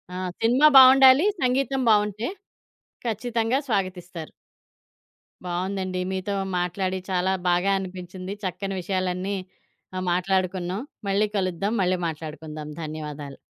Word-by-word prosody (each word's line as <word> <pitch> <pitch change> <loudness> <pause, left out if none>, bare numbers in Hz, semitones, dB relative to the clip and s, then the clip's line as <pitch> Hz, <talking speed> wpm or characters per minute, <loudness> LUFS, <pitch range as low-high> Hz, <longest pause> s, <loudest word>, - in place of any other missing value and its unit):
ఆ! - - -4 0.2
సినిమా 250 +7 +5
బావుండాలి. 265 +3 +8 0.2
సంగీతం 265 +1 +1
బావుంటే 210 +1 +2 0.8
ఖచ్చితంగా 230 +2 0
స్వాగతిస్తారు. 180 -5 -3 1.2
బావుందండి. 185 +1 -2
మీతో 190 +2 -3 0.2
మాట్లాడి 185 +1 -1
చాలా 185 +1 +1 0.2
బాగా 180 +3 +2
అనిపించింది. 185 +1 -7
చక్కని 195 +1 -3
విషయాలన్నీ 185 +1 -2 0.6
ఆహ్, 185 - -2
మాట్లాడుకున్నాం. 185 +2 -1 0.3
మళ్ళీ 200 +2 +2
కలుద్దాం, 190 +2 -1
మళ్ళీ 185 0 +2
మాట్లాడుకుందాం. 155 -1 -7
ధన్యవాదాలు. 150 -2 -6
185 Hz, 100 wpm, -24 LUFS, 180-210 Hz, 1.2 s, బావుండాలి